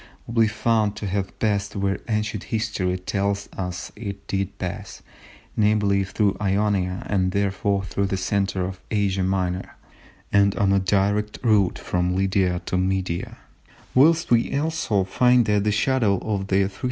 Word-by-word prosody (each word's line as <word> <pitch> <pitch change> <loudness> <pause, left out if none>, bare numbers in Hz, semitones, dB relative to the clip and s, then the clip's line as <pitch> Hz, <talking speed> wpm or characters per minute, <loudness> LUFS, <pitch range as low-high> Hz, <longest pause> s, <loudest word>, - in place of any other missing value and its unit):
C. - - -19 0.2
will 115 0 +1
be 110 - +5
found 105 0 +1
to - - -5
have 95 0 -3
passed 100 -2 -1
where 100 -1 -1
ancient 105 -1 -1
history 110 -5 -1
tells 100 +2 -2
us 90 -2 -5
it 100 -3 -7
did 95 0 -3
pass—namely, 100 +2 -2
through 100 +1 0
Ionia, 100 -2 0
and 95 -2 +1
therefore 100 0 0
through 100 0 -1
the 95 - -1
centre 95 0 0
of 95 0 -6
Asia 100 -3 0
Minor, 95 -1 -1 0.6
and 100 -1 +4
on 100 -1 +2
the 100 - +4
direct 100 +2 +1
route 105 -6 +3
from 90 0 -1
Lydia 95 -2 +1
to 90 - 0
Media; 95 -2 -2 0.6
whilst 160 +4 +4
we 120 +3 +3
also 150 -10 0
find 125 +4 +3
that 105 -1 +1
the 105 - +2
shadow 110 -2 +2
of 95 0 -3
the 95 0 +3
310 - - 0
B. 95 - -18
100 Hz, 160 wpm, -23 LUFS, 95-105 Hz, 0.6 s, be